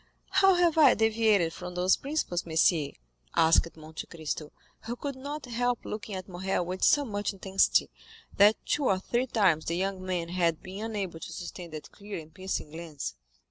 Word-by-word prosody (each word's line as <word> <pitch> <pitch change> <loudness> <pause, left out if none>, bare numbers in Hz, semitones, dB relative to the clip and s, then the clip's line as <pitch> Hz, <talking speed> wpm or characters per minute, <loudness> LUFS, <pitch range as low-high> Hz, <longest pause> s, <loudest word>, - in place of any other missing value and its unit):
"How 385 -1 +5
have 345 -2 +3
I 305 - +7
deviated 215 -6 +3
from 180 0 -7
those 180 +1 +4
principles, 275 - -2
monsieur?" 160 -2 +2 0.5
asked 165 0 +4
Monte 155 0 -8
Cristo, 155 -2 -5 0.3
who 235 +2 -3
could 280 +2 -5
not 285 +3 -6
help 245 0 -1
looking 210 -1 -5
at 185 0 -6
Morrel 185 -1 -2
with 185 +2 -4
so 290 -1 +5
much 205 -3 -2
intensity, 195 0 +2 0.5
that 205 +2 +6
two 290 - 0
or 195 - +3
three 240 +7 -1
times 190 -10 +2
the 170 - -1
young 190 0 -2
man 180 -2 -2
had 170 -3 0
been 190 +3 -7
unable 195 -7 -4
to - - -8
sustain 175 0 -7
that 155 -1 -9
clear 205 0 -8
and 160 -1 -10
piercing 185 -4 -4
glance. 160 - -6
190 Hz, 180 wpm, -29 LUFS, 170-225 Hz, 0.5 s, I